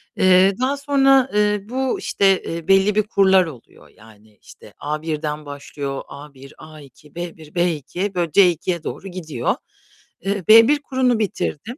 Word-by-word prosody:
Eee, 185 +1 +4
daha 275 +2 0
sonra, 270 -2 +3
eee, 210 0 +1
bu 260 0 -2
işte, 195 -1 +1
eee, 165 +1 -6
belli 195 +2 +3
bir 215 - +2
kurlar 190 -3 +3
oluyor. 135 -8 -13
Yani 105 -1 -20
işte - - -16
A1'den 150 0 -4
başlıyor, 140 -1 -6
A1, 140 -1 -13
A2, 150 -1 -16
B1, 170 -2 -9
B2, 175 +3 -2
böyle 170 -3 -1
C2'ye 175 -2 +2
doğru 195 - -7
gidiyor. 160 -9 -3 0.7
Eee, 195 0 -3
B1 230 +7 +7
kurunu 255 -4 0
bitirdim. 215 - -4
180 Hz, 140 wpm, -20 LUFS, 150-210 Hz, 0.7 s, B1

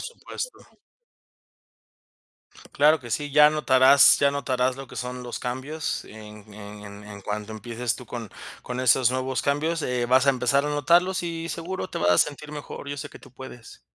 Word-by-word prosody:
supuesto. - - -7 2.1
Claro 150 +2 +4
que 120 -2 -10
sí. 145 +6 -2
Ya 150 +1 +6
notarás 140 -2 +6
ya 140 0 +3
notarás 130 -2 -1
lo 135 0 -8
que - - -13
son 125 0 -5
los 120 - -6
cambios, 135 +6 -4
en 105 -1 -13
en 105 0 -10
en 100 +1 -11
en 100 -1 -10
cuanto 105 +2 -5
empieces 115 +2 -3
tú, 125 - -12
con 115 -4 -7 0.3
con 125 0 -5
esos 125 0 +4
nuevos 130 0 -2
cambios 155 +3 0
eh, 125 -1 -1
vas 130 +2 +3
a 140 - +7
empezar 130 +2 +1
a 150 - -1
notarlos. 175 +5 +2
Y 165 -1 -4
seguro 185 +3 -5
te - - -4
vas 85 0 +2
a 85 - +3
sentir 150 +1 0
mejor, 145 -1 -8
yo 145 - -4
sé 145 +1 -7
que - - -13
tú 130 - -17
puedes. 130 -2 -12
130 Hz, 185 wpm, -25 LUFS, 120-150 Hz, 2.1 s, a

